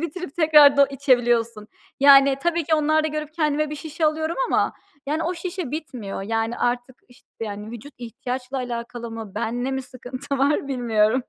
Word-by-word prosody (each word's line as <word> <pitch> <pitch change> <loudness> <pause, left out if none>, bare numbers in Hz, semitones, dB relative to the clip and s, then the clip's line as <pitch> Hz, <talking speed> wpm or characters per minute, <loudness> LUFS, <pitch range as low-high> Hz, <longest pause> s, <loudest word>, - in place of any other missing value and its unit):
bitirip 335 -1 -6
tekrardan 295 -3 +6
içebiliyorsun? 240 -5 +1 0.3
Yani, 275 -1 +7
tabii 340 -2 0
ki 315 +1 +2
onlar 310 +1 +2
da 315 - +1
görüp 305 0 -5
kendime 305 -2 0
bir 300 - -5
şişe 315 +2 -4
alıyorum 315 +2 -1
ama, - - +1 0.3
yani, 310 +3 -1
o 350 +2 -1
şişe 350 -4 -5
bitmiyor. 250 -11 -5
Yani, 225 +3 -2
artık 245 +1 -1
işt 245 +3 -22
yani, 210 0 -5
vücut 240 +5 -10
ihtiyaçla 250 +2 -5
alakalı 235 -1 -5
mı, 225 -4 -8
benle 245 +3 -2
mi 265 0 -2
sıkıntı 255 +2 -6
var 280 +1 +1
bilmiyorum. 235 -2 +1
270 Hz, 165 wpm, -23 LUFS, 240-305 Hz, 0.3 s, Yani